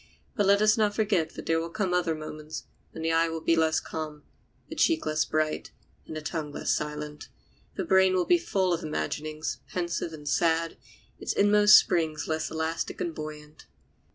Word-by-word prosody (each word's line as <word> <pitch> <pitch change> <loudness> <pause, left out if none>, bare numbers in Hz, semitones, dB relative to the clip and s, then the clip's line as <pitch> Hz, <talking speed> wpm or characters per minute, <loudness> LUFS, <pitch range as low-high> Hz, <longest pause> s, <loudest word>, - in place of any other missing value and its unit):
But 205 -3 +2
let 200 +1 +5
us 215 +1 +4
not 210 -1 +2
forget 200 -7 0
that - - -7
there 165 0 +2
will 165 +1 -4
come 190 0 -1
other 170 -2 +1
moments, 155 0 -7 0.3
when 160 - -8
the 165 - +1
eye 165 0 +3
will 165 0 -3
be 165 +1 +2
less 160 -1 +2
calm, 155 -2 -6 0.4
the - - -7
cheek 330 -1 +2
less 155 -1 +1
bright, 155 0 -1 0.4
and 155 - -7
the 155 - -5
tongue 150 -1 -4
less - - 0
silent; 150 0 -5 0.5
the 190 - -2
brain 190 +1 +4
will 180 - +2
be 350 - +4
full 190 - 0
of 170 - -2
imaginings, 155 0 -3
pensive 170 -2 -2
and 150 -2 -10
sad, 165 +1 +1 0.4
its - - -2
inmost 210 +1 +7
springs 160 -4 +1
less 160 0 -1
elastic 160 +1 -3
and 170 - -2
buoyant. 150 0 -9
165 Hz, 185 wpm, -27 LUFS, 155-185 Hz, 0.5 s, inmost